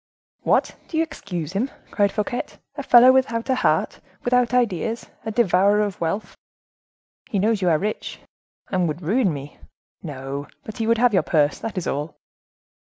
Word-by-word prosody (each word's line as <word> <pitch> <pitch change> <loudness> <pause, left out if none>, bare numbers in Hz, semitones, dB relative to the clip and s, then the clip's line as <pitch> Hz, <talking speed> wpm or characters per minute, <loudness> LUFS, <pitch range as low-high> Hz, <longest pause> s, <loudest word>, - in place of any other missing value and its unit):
"What, - - +1
do 320 - -4
you 325 - +4
excuse 180 - -6
him?" 230 +8 0 0.2
cried 200 -1 +2
Fouquet; 215 +3 -2 0.3
"a 285 - -4
fellow 250 -1 +7
without 245 -2 +1
a - - +4
heart, 255 - +1 0.2
without 250 -1 +2
ideas; 230 -2 0 0.2
a - - 0
devourer 205 -2 +3
of 205 -4 -3
wealth." 170 +6 -2 0.9
"He 205 - -1
knows 210 +1 +1
you 180 - +2
are 160 - +4
rich." 210 +5 -4 0.5
"And 180 -3 +1
would 160 +3 -4
ruin 205 +4 +2
me." 145 -1 -8 0.4
"No, 140 -2 -6 0.2
but 215 - -8
he 225 - -1
would 230 0 +3
have 240 0 +3
your 190 - +4
purse. 150 -2 +1
That 220 -3 -5
is 185 - -2
all." 145 +3 -3
205 Hz, 175 wpm, -23 LUFS, 170-235 Hz, 0.9 s, fellow